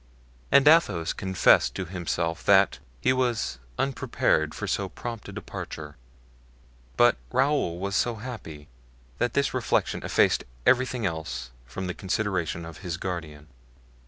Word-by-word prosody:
And 140 +1 +6
Athos 105 - +4
confessed 95 -3 +3
to 95 - -3
himself 85 -2 -2
that, - - +5 0.2
he 130 - +3
was 120 - -1 0.2
unprepared 80 - 0
for - - -4
so - - -1
prompt 115 -3 -7
a - - -6
departure; 75 -1 -7 1.0
but 120 0 +5
Raoul 130 - +1
was 100 +2 -3
so 120 +1 +1
happy 105 -11 -8 0.5
that 120 -1 0
this 140 0 +1
reflection 130 -2 0
effaced - - +3 0.2
everything 130 -2 +3
else 70 -8 -4 0.2
from 95 +9 -5
the 90 - -3
consideration 95 -4 -2
of 80 -1 -10
his 90 -3 -4
guardian. 80 -5 -5
95 Hz, 130 wpm, -26 LUFS, 80-120 Hz, 1.0 s, And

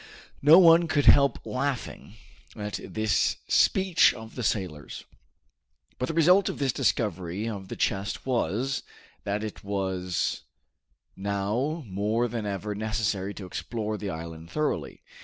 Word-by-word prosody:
No 150 +4 +8
one 170 -2 +7
could 145 -3 +1
help 140 -1 +5
laughing 130 -5 -4 0.4
at 105 -1 -4
this 110 -2 0
speech 190 -3 +4
of 110 0 -10
the 125 - -5
sailor's. 90 -10 -3 0.9
But 125 - -1
the 165 - -4
result 180 +4 +5
of - - -5
this 135 -3 0
discovery 95 -1 -1
of 100 -4 -5
the - - -6
chest 100 0 -2
was, 130 +1 -1 0.4
that 105 +1 -2
it 110 - -7
was 95 -3 -2 0.7
now 105 - -2
more 105 +4 0
than 115 -2 -4
ever 100 +1 -3
necessary 105 -2 -2
to 100 - -7
explore 110 +3 -4
the 105 -1 -5
island 80 -1 -7
thoroughly. 150 -1 -2
110 Hz, 135 wpm, -27 LUFS, 100-135 Hz, 0.9 s, No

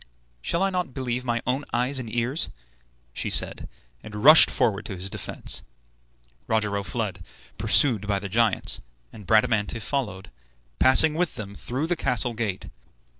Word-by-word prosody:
"Shall 170 - -1
I 195 - +1
not 180 -8 -3
believe 125 -1 -3
my 120 -1 -2
own 130 +3 -1
eyes 125 +3 0
and 115 -3 -7
ears?" 120 - -1 0.6
she - - -2
said, - - -1 0.3
and 105 0 -8
rushed 155 +2 +9
forward 110 -6 0
to 100 - -6
his 95 +1 -3
defence. - - -3 0.9
Rogero 105 -2 0
fled, 100 -3 -4 0.4
pursued 110 -8 +3
by 100 -1 +1
the 100 +1 -5
giants, 110 +1 +1 0.3
and 105 -4 -12
Bradamante 110 0 +2
followed, 105 -5 -4 0.5
passing 150 +4 +6
with 175 +1 -1
them 100 -2 -7
through 130 +8 -4
the 175 +2 0
castle 125 -5 -1
gate. 110 -5 -4
115 Hz, 150 wpm, -25 LUFS, 105-130 Hz, 0.9 s, rushed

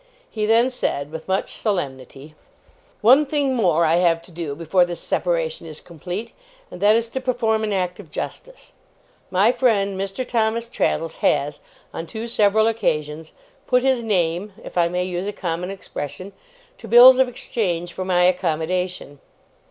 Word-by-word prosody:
He 215 -1 -2
then 230 +3 +4
said 145 - -3
with 160 0 -8
much 190 +1 -1
solemnity: 140 - -4 0.7
'One 255 +7 +6
thing 285 -2 0
more 175 -9 +2
I 165 +1 +3
have 170 -2 +3
to - - -15
do, 160 -4 -5
before 170 +3 +2
this 175 -1 -4
separation 165 -2 -2
is 155 -1 -9
complete, 180 +7 -7 0.4
and - - -10
that 210 +2 +5
is 230 0 0
to 265 - -4
perform 230 -4 0
an 215 - -1
act 180 -2 -2
of 185 -7 -12
justice. - - -7 0.6
My 195 +5 +3
friend 205 -7 +1
Mr. 195 +6 -4
Thomas 230 0 0
Traddles 165 -8 -1
has, 145 +1 0 0.3
on 165 - -6
two 220 +7 -6
several 215 -1 +3
occasions, 155 -8 -2 0.3
"put 250 0 +2
his 265 -2 +2
name", 190 -2 -1
if - - -10
I 175 -1 +3
may 180 +1 -1
use 180 +1 -4
a - - -1
common 175 -2 -4
expression, 190 0 -7 0.5
to 225 - -10
bills 250 +3 +8
of 260 - +4
exchange 175 -8 -3
for 185 - -4
my 180 -1 +2
accommodation. 180 -3 -1
185 Hz, 165 wpm, -22 LUFS, 165-225 Hz, 0.7 s, bills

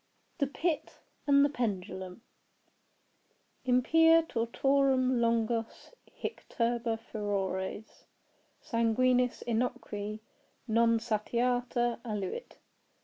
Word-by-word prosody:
THE 280 - +2
PIT 315 +2 -2 0.3
AND 280 0 +6
THE - - +1
PENDULUM 190 -5 -4 1.4
Impia 325 +6 +5
tortorum 260 +1 +2
longos 230 - -1 0.2
hic - - -6
turba 235 -1 0
furores 205 -2 -4 0.6
Sanguinis 250 +2 +2
innocui, 220 -3 -2 0.5
non 230 +1 +3
satiata, 240 +2 0
aluit. 210 - -5
235 Hz, 75 wpm, -31 LUFS, 220-255 Hz, 1.4 s, AND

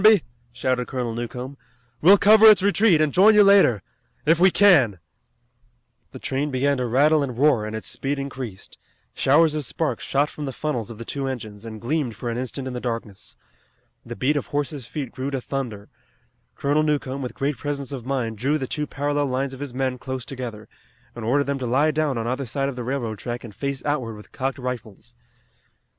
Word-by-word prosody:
shouted 125 0 -1
Colonel 125 -3 -3
Newcomb. 125 +3 -6 0.4
"We'll 190 +6 +8
cover 215 +2 +7
its 205 -4 +6
retreat, 200 -4 +4
and 155 -2 +1
join 210 +4 +6
you 210 - +8
later 195 - +5 0.4
if 165 +1 +4
we 185 +2 +7
can." 160 - +5 1.1
The - - -9
train 140 +3 -2
began 140 +1 +1
to 125 -1 -1
rattle 145 +6 +4
and 125 -4 -3
roar, 130 -6 +3
and 110 - -5
its 110 - -5
speed 140 +1 -3
increased. 130 -7 -7 0.3
Showers 150 +3 +4
of 155 -1 -2
sparks 155 +4 -2
shot 145 +2 +1
from 150 - -6
the 135 - -4
funnels 125 -8 -3
of 115 - -8
the 115 - -8
two 135 +2 -3
engines, 110 -5 -6
and 110 -1 -7
gleamed 125 -1 -2
for 120 +1 -4
an 115 - -3
instant 130 +1 -4
in 130 - -5
the 125 - -3
darkness. 115 -5 -6 0.7
The - - -7
beat 135 +9 +1
of 145 - -2
horses' 145 -3 -3
feet 140 -6 -5
grew 130 +2 -4
to 135 -1 -2
thunder. 120 -6 -5 0.7
Colonel 145 +2 +1
Newcomb 140 -3 -1
with 125 -3 -5
great 140 0 -1
presence 140 0 -4
of 135 -4 -5
mind 120 -4 -2
drew 140 +6 +1
the 135 - -3
two 150 +3 -3
parallel 145 +1 -1
lines 135 +1 -2
of 135 - -9
his 145 -2 -5
men 130 0 -2
close 130 -1 -5
together, 115 -5 -7 0.5
and 120 - -7
ordered 135 +6 +2
them 140 -1 -2
to 125 - -3
lie 140 +6 +3
down 150 -4 0
on 115 - -2
either 130 +2 -2
side 135 +4 -1
of 135 - -6
the 125 - -5
railroad 120 -4 -3
track 120 +2 -5
and 115 -4 -10
face 140 +3 -4
outward 130 -7 -1
with 105 - -14
cocked 135 0 -3
rifles. 125 -5 -6
135 Hz, 205 wpm, -23 LUFS, 120-145 Hz, 1.1 s, We'll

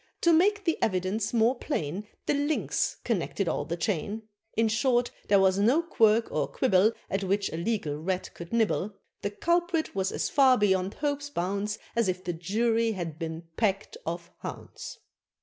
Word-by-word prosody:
To 340 - +5
make 405 +5 +3
the 330 - 0
evidence 190 +2 0
more 235 +1 +4
plain, 205 - -3 0.2
The - - +2
Lynx 290 +2 0
connected 200 -3 -1
all - - -1
the 170 +1 -3
chain. 205 +4 -2 0.3
In 225 0 +4
short 240 +2 +2 0.2
there 200 -1 +5
was 190 0 +3
no 250 +11 +4
quirk 225 -8 +3
or - - 0
quibble 215 -3 +3
At 195 +1 -2
which 200 +1 0
a - - -3
legal 170 -6 -1
Rat 185 +3 -2
could 170 0 -9
nibble; 215 -3 +1 0.3
The 205 - -1
Culprit 340 - 0
was 190 -1 0
as - - -1
far 265 -3 +5
beyond 190 -2 +1
hope's 290 -1 -2
bounds. 200 -1 -2 0.2
As 235 -3 +2
if 185 0 -2
the 175 - -2
Jury 225 +6 +1
had 170 -5 -5
been 165 0 -4
packed 200 -3 0
of 170 +1 -5
hounds. - - -8
205 Hz, 170 wpm, -28 LUFS, 185-240 Hz, 0.3 s, To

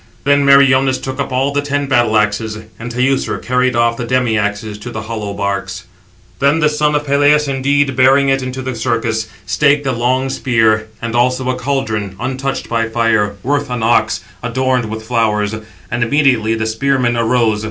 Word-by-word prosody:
Then 140 0 +3
Meriones 135 -1 +4
took 130 +1 -6
up 140 - -2
all 135 +2 0
the 145 - +1
ten 145 0 -2
battle 120 -5 +2
axes, 105 +1 -1 0.2
and 115 +1 -6
Teucer 130 +2 0
carried 125 0 0
off 115 0 +2
the - - -4
demi 125 -1 0
axes 105 0 -2
to 120 - -7
the 110 -2 -6
hollow 110 -2 -5
barks. 100 -2 -3 0.5
Then 140 +3 +2
the 150 -1 +3
son 150 0 0
of 150 0 -1
Peleus 145 +1 +3
indeed, 140 0 +1
bearing 135 +2 +4
it 135 0 +1
into 130 0 -5
the 130 0 -3
circus, 115 -2 -1 0.2
staked 145 -1 +2
a 135 - +1
long 130 +2 0
spear, 110 -4 +1 0.2
and 115 0 -3
also 125 +1 +1
a - - -3
caldron, 125 -7 -2
untouched 130 +3 -3
by 115 -1 -1
fire, 110 -3 +1
worth 145 +1 -1
an 125 -2 -3
ox, 115 +1 +1 0.2
adorned 125 0 0
with 110 0 -6
flowers; 110 -3 0 0.4
and 120 +1 0
immediately 120 -4 +2
the 110 0 -2
spearmen 120 +2 0
arose. 115 -2 +1
125 Hz, 180 wpm, -16 LUFS, 110-135 Hz, 0.5 s, Meriones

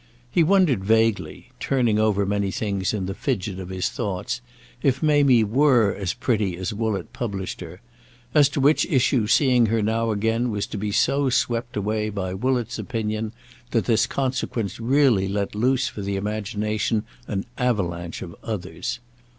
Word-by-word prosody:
He - - +1
had 165 - +3
wondered 175 - +3
vaguely—turning 115 +2 +1
over 105 -2 +2
many 100 0 0
things 100 -2 -1
in 100 -4 -2
the 95 - -3
fidget 100 -5 -2
of 95 -1 -7
his 95 -1 -1
thoughts—if 95 - -3
Mamie 140 -6 +5
were 120 -2 +3
as 95 -3 -3
pretty 105 -7 0
as 95 +2 -3
Woollett 105 -4 -2
published 100 -7 -4
her; 90 +2 -9 0.5
as 145 -3 +6
to 145 - -3
which 145 +3 +4
issue 130 -7 +2
seeing 125 -1 +4
her 110 0 +1
now 115 +2 0
again 115 +3 0
was 105 -2 -2
to - - -6
be 105 +1 -2
so 135 +6 +2
swept 120 -1 -1
away 105 +1 -1
by 95 -3 -3
Woollett's 120 +3 -1
opinion 110 -2 -3 0.4
that 115 -3 0
this 115 -1 +3
consequence 125 -6 -2
really 120 -5 +3
let 100 0 -2
loose 130 +4 +1
for 110 - -6
the 100 0 -2
imagination 105 +1 -1 0.2
an 100 -2 -3
avalanche 85 -9 -1
of 85 - -9
others. 105 0 -4
110 Hz, 160 wpm, -24 LUFS, 100-125 Hz, 0.5 s, as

